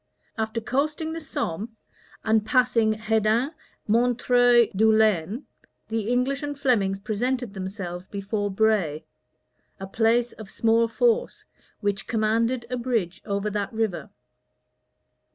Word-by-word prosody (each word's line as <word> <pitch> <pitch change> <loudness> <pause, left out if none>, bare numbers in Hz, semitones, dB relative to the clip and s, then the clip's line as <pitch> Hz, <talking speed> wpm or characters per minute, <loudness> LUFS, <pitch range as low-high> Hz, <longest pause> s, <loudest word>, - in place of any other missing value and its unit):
After 220 0 -2
coasting 300 +7 -1
the 330 - -5
Somme, 220 - -4 0.5
and 220 -1 +2
passing 230 -1 +3
Hedin, 220 +4 +1 0.4
Montreuil, 245 +1 +4
Dourlens, 215 - +3 0.5
the 225 -1 -2
English 255 +3 +1
and 290 -1 -4
Flemings 205 -8 +1
presented 235 +2 -2
themselves 185 -2 -6
before 205 +1 -3
Bray, 190 -7 +1 0.7
a 195 - -5
place 230 +4 +2
of 220 -3 -11
small 230 +2 +2
force, 480 - 0 0.4
which 200 -2 -1
commanded 230 +2 +1
a 250 - -1
bridge 230 -8 -2
over 200 +1 -1
that 205 -1 -2
river. 220 -5 -2
220 Hz, 115 wpm, -25 LUFS, 205-245 Hz, 0.7 s, Montreuil